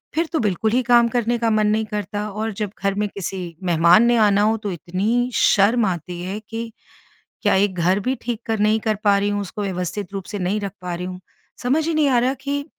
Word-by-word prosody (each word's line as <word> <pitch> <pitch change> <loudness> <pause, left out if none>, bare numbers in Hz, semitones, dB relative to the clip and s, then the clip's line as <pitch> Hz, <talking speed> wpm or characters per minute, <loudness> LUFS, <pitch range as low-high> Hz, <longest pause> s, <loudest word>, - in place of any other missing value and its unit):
फिर 330 +2 +2
तो 320 - +1
बिल्कुल 215 0 0
ही 255 +2 +2
काम 240 -1 +5
करने 240 0 0
का 230 -1 +1
मन 215 -1 +2
नहीं 215 +1 +1
करता। 210 0 -4
और 215 +2 -3
जब 205 -1 -4
घर 195 0 +2
में 210 0 0
किसी 195 -1 -5 0.2
मेहमान 175 +4 +5
ने 240 0 +3
आना 205 -2 +4
हो, 220 +2 +2
तो 205 -3 -4
इतनी 205 +9 -1
शर्म 215 +3 +4
आती 175 -1 -4
है 190 +3 -4
कि 225 0 -5 0.7
क्या, - - +3
एक 195 0 +2
घर 180 +3 +2
भी 255 +6 -1
ठीक 235 -1 -4
कर 225 -1 -1
नहीं 215 +1 +3
कर 215 -1 0
पा 200 -1 +4
रही 200 +1 0
हूँ? 205 0 -1
उसको 200 +2 -6
व्यवस्थित 190 +1 -4
रूप 195 - -4
से 205 - -3
नहीं 190 +3 -1
रख 200 - -4
पा 180 -1 -4
रही 180 +1 -5
हूँ? 185 0 -7 0.4
समझ 300 +6 +1
ही 330 - 0
नहीं 310 -2 +3
आ 245 -2 +4
रहा 255 +2 +1
कि 285 0 -2
210 Hz, 240 wpm, -21 LUFS, 195-230 Hz, 0.7 s, काम